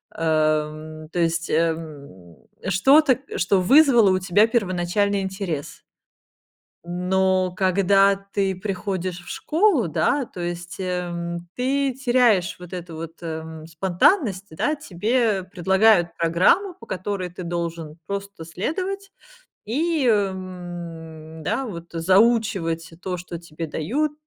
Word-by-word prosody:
Э, - - -8
м, 155 0 0
то 175 - -3
есть, 165 0 0
эм, 150 - -3 0.3
что-то, 265 - +5 0.2
что 185 +1 +2
вызвало 240 - +6
у 185 - +2
тебя 195 +4 +3
первоначальный 200 -2 0
интерес. 190 -6 -5 1.0
Но, 185 +1 +1
когда 195 +1 +4
ты 195 -1 -2
приходишь 185 -2 -3
в 175 - -13
школу, 325 - +2
да. 255 - +1
То 180 - -9
есть, 175 +1 -5
эм, 175 -2 -3
ты 270 +2 0
теряешь 240 -8 +2
вот 180 0 -11
эту 175 -2 -7
вот, 165 +1 -7
эм, 160 -1 -6
спонтанность, 190 - +1
да. 290 - 0
Тебе 220 -3 0
предлагают 190 0 +3
программу, 180 - +3
по - - -14
которой 185 0 -3
ты 180 +1 -8
должен 170 -2 -4
просто 200 -3 -5
следовать 370 - -4 0.6
и, 305 +4 0
м, 175 -6 -3
да 265 - -1
вот, 170 -5 -7
заучивать 185 -2 +2
то, 180 -1 -3
что 170 -1 -7
тебе 165 -1 -7
дают. 255 - -1
185 Hz, 120 wpm, -23 LUFS, 170-210 Hz, 1.0 s, вызвало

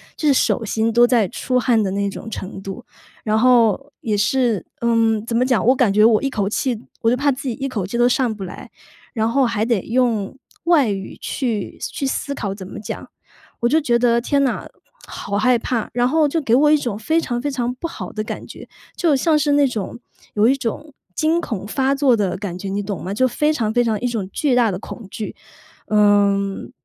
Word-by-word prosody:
就 305 - +1
是 - - +5
手 245 - +1
心 220 +1 0
都 240 +1 +6
在 240 -5 +3
出 250 +7 -1
汗 235 -3 +2
的 190 - -1
那 200 0 -1
种 220 - -8
程 195 -2 -6
度。 195 +6 -8 0.4
然 215 0 +2
后 250 +3 +3
也 215 -2 -1
是， 230 0 +1
嗯， 225 -2 +2
怎 230 0 -3
么 250 +2 +3
讲 250 -3 +2
我 255 - +6
感 245 -6 +3
觉 210 +2 +5
我 225 +2 +4
一 275 - +1
口 205 -6 -1
气 235 +2 -1 0.2
我 225 - +3
就 250 - +1
怕 285 +2 +2
自 265 0 -5
己 - - -2
一 275 -1 -3
口 210 -8 -3
气 220 +5 -4
都 240 0 +4
上 250 -2 +1
不 200 -3 -7
来， 180 - -10 0.4
然 220 -2 0
后 265 +2 +3
还 225 -2 0
得 230 -5 +1
用 235 -2 0 0.3
外 325 -8 +4
语 195 -1 -5
去 230 -7 -3
思 - - -3
去 280 - -3
思 280 +1 -2
考 200 -7 -4
怎 195 -2 -9
么 185 - -8
讲。 210 - -7 0.5
我 235 - +2
就 315 +5 +3
觉 240 -4 +2
得： 235 -1 +3
“天 280 +3 +1
呐， 260 - -1 0.4
好 200 - -4
害 250 +3 +3
怕！” 230 -1 -2
然 245 +1 +2
后 310 +3 +3
就 325 +3 0
给 235 -5 0
我 295 +4 +5
一 305 - +6
种 240 -8 -3
非 320 +9 +1
常 240 -7 -3
非 290 - -1
常 250 -2 -2
不 335 +6 -4
好 - - -7
的 215 - -3
感 - - -6
觉， - - -11 0.3
就 325 -6 +2
像 305 +3 +2
是 290 -1 +2
那 285 -1 +4
种 225 -5 -4 0.4
有 210 +1 +3
一 265 - +4
种 275 +4 -5 0.2
惊 320 +2 +2
恐 210 - -4
发 270 +4 +1
作 275 -4 +4
的 190 -3 -1
感 185 -3 -5
觉， 200 - -6
你 200 +1 -2
懂 200 -1 -4
吗？ 190 - -3
就 255 +5 +2
非 300 +5 +1
常 220 -7 -1
非 245 - +3
常 220 -3 0
一 250 - 0
种 215 -6 -3
巨 290 -4 0
大 240 -2 +4
的 180 - -3
恐 225 -2 -9
惧。 215 - -6 0.5
嗯， 200 -1 +2
235 Hz, 250 characters per minute, -20 LUFS, 210-265 Hz, 0.5 s, 都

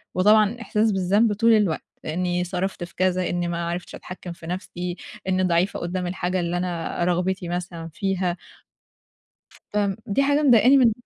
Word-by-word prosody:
وطبعًا 210 +4 +4
إحساس 220 -1 +1
بالذنب 200 +3 +2
طول 230 +3 +4
الوقت 205 -7 +2 0.2
إنّي 180 +2 -1
صرفت 180 +1 -3
في 175 - -10
كذا، 185 0 +1
إنّي 175 0 -1
ما 170 0 -2
عرفتش 175 +1 -5
أتحكِّم 180 -1 -8
في 165 -1 -12
نَفْسي، 180 0 -4 0.3
إنّي 185 0 +2
ضعيفة 180 +2 +1
قُدّام 180 +1 -3
الحاجة 180 0 -1
اللي 175 0 -1
أنا 175 -1 -2
رغبتي 180 0 0
مثلًا 175 -2 -4
فيها. 185 -1 -1 1.4
فم 205 -2 +1
دي 220 +5 +1
حاجة 285 +2 +2
مضايقاني 250 -1 +6
من 245 -4 +5
185 Hz, 155 wpm, -24 LUFS, 175-205 Hz, 1.4 s, مضايقاني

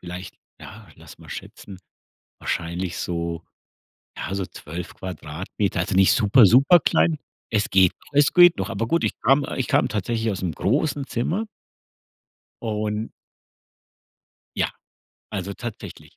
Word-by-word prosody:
vielleicht 90 +1 -8 0.3
ja, - - -12
lass - - -15
mal - - -15
schätzen, 95 -3 -9 0.6
wahrscheinlich 85 +1 -3
so 85 -1 -3 0.8
ja, 95 - -4
so 95 -2 -2
12 85 +3 -8
Quadratmeter, 95 +2 -4
also 95 - -1
nicht 95 0 +6
super, 110 +1 +6
super 140 - +6
klein. 80 - +2 0.3
Es 105 -2 +1
geht 95 -2 +5
noch, - - -20
es 145 0 +4
geht 175 - +7
noch. 95 +3 -3
Aber 115 +1 -2
gut, 170 - +1
ich - - -1
kam 135 +4 +3
ich 130 - -1
kam - - +3
tatsächlich 110 +2 -1
ausm 95 -3 -2
großen 140 - 0
Zimmer 175 - -1 1.2
und 105 0 -2 1.5
ja, - - +1 0.6
also 100 -1 -4
tatsächlich. 120 0 -9
100 Hz, 135 wpm, -23 LUFS, 90-120 Hz, 1.5 s, geht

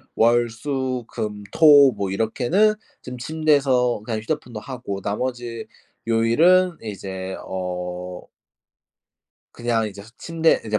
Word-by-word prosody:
월, 120 +1 +3
수, 130 0 -3
금, 105 -1 -5
토 145 -4 +7
뭐 100 -3 -3
이렇게는 125 - +2 0.3
좀 125 0 -7
침대에서 135 -5 +1
그냥 110 -2 -2
휴대폰도 125 -4 -4
하고 125 -6 -6
나머지 120 +2 -4 0.4
요일은 160 +11 +4
이제 95 -3 -6
어 90 -1 -5 1.3
그냥 115 -2 -1
이제 100 -1 -10
침대 165 +2 +1
이제 110 -1 0
120 Hz, 215 characters per minute, -22 LUFS, 105-140 Hz, 1.3 s, 토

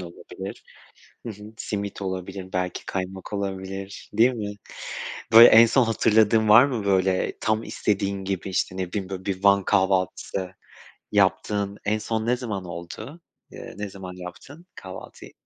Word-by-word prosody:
olabilir. 85 -1 -9 0.6
Hı - - -4
hı. 105 0 -13
Simit 100 -1 -4
olabilir, 95 0 -5
belki 90 -1 -2
kaymak 95 +1 -5
olabilir, 95 0 -5
değil 120 +4 +4
mi? 105 -3 -5 0.8
Böyle 115 +1 +11
en 115 +1 +8
son 125 +3 +3
hatırladığın 110 0 +3
var 120 +5 +9
mı, 120 -7 -3
böyle, 95 -1 +2
tam 110 +1 +1
istediğin 100 -1 -1
gibi, 95 0 -3
işte, 95 0 -1
ne 90 -1 -3
bileyim, 95 -3 -3
böyle, 95 0 -6
bir 95 -1 -3
Van 100 -1 +5
kahvaltısı 95 -1 0 0.6
yaptığın 100 0 +1
en 105 +1 +1
son 110 0 -2
ne 120 +2 +2
zaman 105 -7 -4
oldu? 90 - -8 0.3
Eee, - - -9
ne 105 0 -4
zaman 95 -2 -9
yaptın 130 - -11
kahvaltıyı? 95 -2 -10
100 Hz, 145 wpm, -24 LUFS, 95-110 Hz, 0.8 s, Böyle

